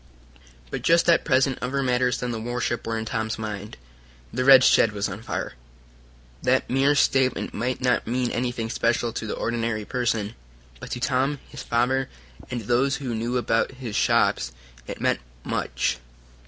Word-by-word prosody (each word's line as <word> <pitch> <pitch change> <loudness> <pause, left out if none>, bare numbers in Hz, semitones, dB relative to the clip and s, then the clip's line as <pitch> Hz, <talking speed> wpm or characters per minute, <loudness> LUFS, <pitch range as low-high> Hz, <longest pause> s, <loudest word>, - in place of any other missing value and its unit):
But - - -3
just 170 0 +4
at 170 - +5
present 135 -2 +2
other 135 +2 -1
matters 125 -1 +1
than 125 -1 -3
the 115 -1 -4
warship 120 0 -2
were 115 0 -1
in 110 - -3
Tom's 110 0 -2
mind. 105 -1 -6 0.6
The 125 - 0
red 130 -1 +8
shed 110 -4 +5
was 100 -1 -1
on 100 +2 -7
fire. 120 - -4 0.9
That 130 +1 +2
mere 135 +3 +3
statement 130 -2 +2
might 125 +4 -2
not 125 -3 +1
mean 125 +1 0
anything 120 -2 -2
special 115 -1 0
to 110 - -4
the - - -3
ordinary 115 -2 -2
person, 115 -4 -1 0.5
but - - -9
to 125 - -4
Tom, 135 +3 +1
his - - -8
father, 130 +3 +1 0.4
and 120 -1 -3
those 125 +5 +1
who 130 -4 -4
knew 115 +3 -1
about 115 +1 +1
his 125 -5 -6
shops, - - +2 0.4
it - - -6
meant - - +1 0.2
much. 60 - -1
120 Hz, 170 wpm, -25 LUFS, 115-130 Hz, 0.9 s, red